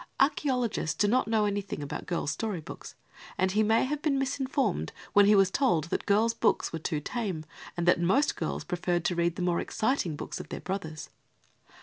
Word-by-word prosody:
Archaeologists 260 - +1
do 205 - +3
not 245 +2 +2
know 220 -1 +2
anything 200 -6 -3
about 145 - -6
girls' 170 -4 -1
story 210 +1 -3
books, 155 - -10 0.4
and 190 0 +2
he 210 +3 +2
may 220 +1 +3
have 295 +2 -3
been 295 -3 +1
misinformed 270 - -1 0.2
when 205 0 +6
he 210 - +6
was 195 -1 +4
told 240 - +2
that - - -2
girls' 220 +3 +3
books 230 - +1
were 165 - -3
too 155 -1 -2
tame 185 - -3 0.3
and 175 0 -1
that 175 -1 +4
most 255 - +2
girls - - -3
preferred 175 -1 -1
to 180 - +2
read 170 0 0
the 180 - -3
more 175 -1 +1
exciting 220 - -1
books - - -6
of - - -8
their - - -5
brothers. 160 -5 -5
200 Hz, 200 wpm, -29 LUFS, 170-240 Hz, 0.4 s, when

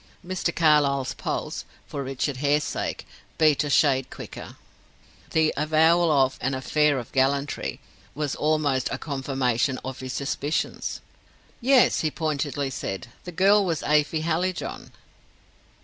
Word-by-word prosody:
Mr. 180 -2 -2
Carlyle's 145 -4 +3
pulse - - -4 0.2
for 140 - -5
Richard 135 +1 -2
Hare's 145 +2 +2
sake - - -4 0.3
beat 155 -3 +4
a 145 - -3
shade 135 -3 +3
quicker. - - -9 0.7
The 160 -1 +2
avowal 160 +3 +3
of 135 -2 +2
"an 130 +1 0
affair 150 +2 +2
of 120 - -6
gallantry" 140 +2 0 0.4
was 150 -2 -2
almost 150 -4 +1
a - - -2
confirmation 135 -3 -1
of 130 0 -5
his 130 -1 -5
suspicions. 140 +2 -2 0.6
"Yes," 260 0 +4
he 155 - +1
pointedly 145 -3 -2
said. 95 -4 -5 0.2
"The 180 - -6
girl 195 +4 +4
was 170 -5 -1
Afy 150 +1 +2
Hallijohn." 170 +2 -2
145 Hz, 130 wpm, -25 LUFS, 135-160 Hz, 0.7 s, beat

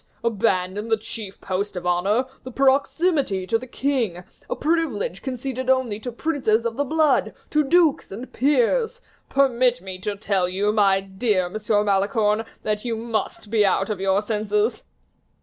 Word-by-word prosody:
abandon 205 -2 0
the 225 -1 +2
chief 215 -2 -8
post 195 +2 -3
of 180 0 -5
honor, 195 +8 +2 0.2
the 255 - -7
proximity 275 - +2
to 225 +4 +1
the 255 - -9
king, 240 -10 -1 0.3
a - - -1
privilege 300 - -1
conceded 260 0 -4
only 255 -5 +1
to 245 +2 -5
princes 235 -5 0
of 230 -1 -1
the 285 - 0
blood, 310 +1 +2 0.2
to 300 0 +3
dukes, 320 - +3
and 235 +7 -8
peers! 295 - +2 0.3
Permit 255 -2 +3
me 190 -1 -8
to 205 +2 -3
tell 195 -3 0
you, 200 +3 +1
my 195 -2 +4
dear 190 -1 0
Monsieur 210 +2 0
de - - -6
Malicorne, 210 +2 +2 0.2
that 210 -1 -1
you 235 -2 -2
must 225 -2 -3
be 220 -2 +4
out 195 +1 +1
of 205 - -3
your 195 +1 +2
senses." 210 +1 0
220 Hz, 165 wpm, -23 LUFS, 200-260 Hz, 0.3 s, my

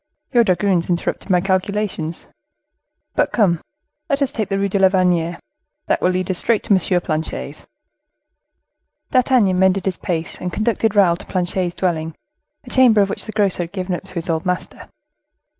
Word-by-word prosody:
Your 240 -1 +6
dragoons 185 -3 +1
interrupted 175 +3 -2
my 180 -2 +3
calculations. 190 -3 -2 0.9
But - - +1
come, 180 -8 +2 0.5
let 280 -1 +1
us 275 - +1
take 215 -3 -3
the 195 - 0
Rue 200 0 +1
de 200 +1 -1
la 190 -1 +6
Vannerie: 175 -3 +1 0.5
that - - 0
will 180 - +3
lead 185 0 -1
us 180 - -1
straight 230 -2 +1
to - - +2
M. 180 -1 +2
Planchet's." 160 -2 -4 1.4
D'Artagnan 245 -8 +3
mended 190 0 +3
his 190 -3 -1
pace, 165 -2 -4
and 180 - -3
conducted 220 +1 0
Raoul 180 -4 +4
to - - -11
Planchet's 180 -1 -1
dwelling, 165 -3 -2 0.5
a 245 - -12
chamber 245 -5 +5
of 195 0 +1
which - - -4
the 215 - -6
grocer 200 -4 +1
had 170 +1 -6
given 185 -1 -3
up 175 - -4
to 185 -1 -15
his 170 +2 -4
old 160 -1 -1
master. 180 -2 -4
185 Hz, 175 wpm, -20 LUFS, 175-205 Hz, 1.4 s, Your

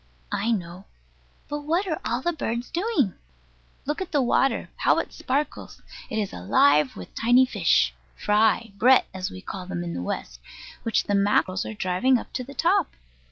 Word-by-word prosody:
I 225 - -1
know: 185 -3 -3 0.6
but 295 - -3
what 330 +7 0
are 325 -5 -3
all 240 +3 -2
the 345 - +1
birds 240 -5 -3
doing? 345 - +1 0.7
Look 295 +5 -2
at 375 - -5
the 295 - +2
water, 265 +2 +1
how - - +3
it - - -2
sparkles. 280 +3 -3 0.3
It 220 - -3
is 205 -3 -2
alive 140 +10 +3
with 90 - -10
tiny 245 +3 +4
fish, 115 - +2 0.2
"fry," 220 +1 +2
"brett" 255 +4 +6
as 185 -1 -3
we 95 - -9
call 185 - -7
them 175 -2 -4
in 170 -1 -4
the - - -4
West, - - -5 0.4
which 230 - +1
the 205 - -2
mackerel 200 -2 +2
are 220 - -6
driving 205 +8 +2
up - - -9
to 255 - -3
the 280 +3 -11
top. 350 +2 +1
225 Hz, 180 wpm, -25 LUFS, 185-275 Hz, 0.7 s, brett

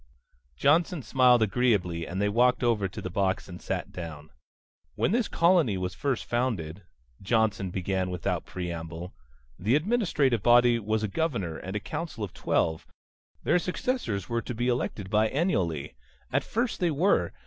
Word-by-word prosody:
Johnson 155 - +2
smiled 125 -3 +4
agreeably 95 -7 +1
and 90 +2 -4
they 105 - +2
walked 125 +5 +3
over 110 -5 +2
to 95 - -8
the 95 - -3
box 95 +1 0
and 90 -2 -9
sat - - -3
down. 80 -4 -8 0.6
"When - - +1
this 235 0 +1
colony 170 - +3
was 90 -1 -3
first 135 -4 -2
founded," 100 -9 -2 0.4
Johnson 105 -2 +1
began 95 +1 -1
without 90 -1 -2
preamble, 85 0 -6 0.5
"the 110 +8 +2
administrative 155 - +1
body 120 0 +5
was 110 0 -1
a - - +1
governor, 100 - -2
and 95 +5 -6
a - - 0
council 150 -1 -5
of 100 - -5
twelve. 80 -6 0 0.6
Their 180 - +3
successors 180 - -2
were 115 -1 -1
to 120 - -6
be 120 +2 0
elected 105 -5 -2
biennially. 105 - +1 0.4
At - - +2
first 235 +1 -1
they 175 - +2
were. 165 +6 +2
110 Hz, 155 wpm, -28 LUFS, 90-135 Hz, 0.6 s, body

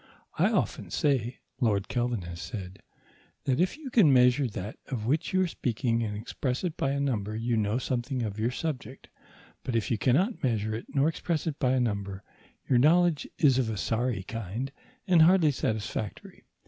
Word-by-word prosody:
"I - - +4
often - - -1
say," 130 -4 0 0.2
Lord 105 -6 +1
Kelvin 120 -5 -1
has 85 -1 -7
said, 95 -4 -7 0.6
"that 130 -2 +1
if 185 +10 +1
you 290 -5 -8
can 205 - +6
measure 125 +1 +5
that 105 -1 -6
of 115 -5 -4
which 145 +7 0
you 185 0 +3
are - - +1
speaking 120 -5 -1
and 105 -2 -2
express 125 - -3
it 175 -4 -2
by 135 - 0
a 140 +1 -1
number 110 -7 -1
you 115 +1 0
know 110 +1 +1
something 125 0 -2
of 105 -1 -4
your 115 +2 +1
subject; 130 -2 -5 0.5
but 125 - -3
if 115 +1 0
you 115 - +1
cannot 175 - +2
measure 110 -4 0
it 110 - -5
nor 140 +1 +2
express 165 -1 -1
it 155 -3 -3
by 130 -3 +2
a 130 - +2
number, 100 -4 -2 0.4
your 125 - +4
knowledge 165 +2 +4
is 135 -5 +4
of 120 -4 0
a 110 - -3
sorry 115 0 -1
kind 115 +5 -5 0.3
and 180 -5 +5
hardly 165 -2 +6
satisfactory. 110 -4 -4
125 Hz, 185 wpm, -28 LUFS, 110-140 Hz, 0.6 s, can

